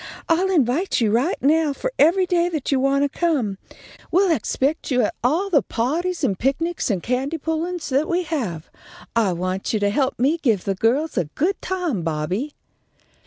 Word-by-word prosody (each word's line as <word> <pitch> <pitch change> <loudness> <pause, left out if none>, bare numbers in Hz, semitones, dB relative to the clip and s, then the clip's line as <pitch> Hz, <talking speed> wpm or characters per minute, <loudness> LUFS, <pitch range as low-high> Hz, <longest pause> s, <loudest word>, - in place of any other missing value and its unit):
I'll 355 +4 +2
invite 320 +1 +1
you 220 -3 +2
right 255 - +1
now 300 +1 +3
for - - -4
every 345 +6 +5
day 350 -1 +1
that 310 -6 -3
you 270 - +3
want 275 +1 +2
to 285 - -3
come. 260 - 0 0.5
We'll 370 +1 +3
expect 275 +5 -1
you 250 -3 +2
at - - 0
all 340 +11 +1
the 290 -6 +5
pahties 330 +9 -2
and 200 -9 0
picnics 325 +6 -1
and 190 -5 -1
candy 265 +6 -1
pullin's 320 +2 -3
that 280 +4 +1
we 355 +1 +1
have. 225 - -4 0.4
I 220 -5 +3
want 185 +4 -3
you 215 - +1
to 205 0 +1
help 265 +4 0
me 285 +7 +1
give 220 - +1
the 195 - 0
girls 240 +7 +1
a 175 - 0
good 330 - -2
time, 355 - -2
Bobby." 165 - -2
280 Hz, 185 wpm, -22 LUFS, 230-335 Hz, 0.5 s, every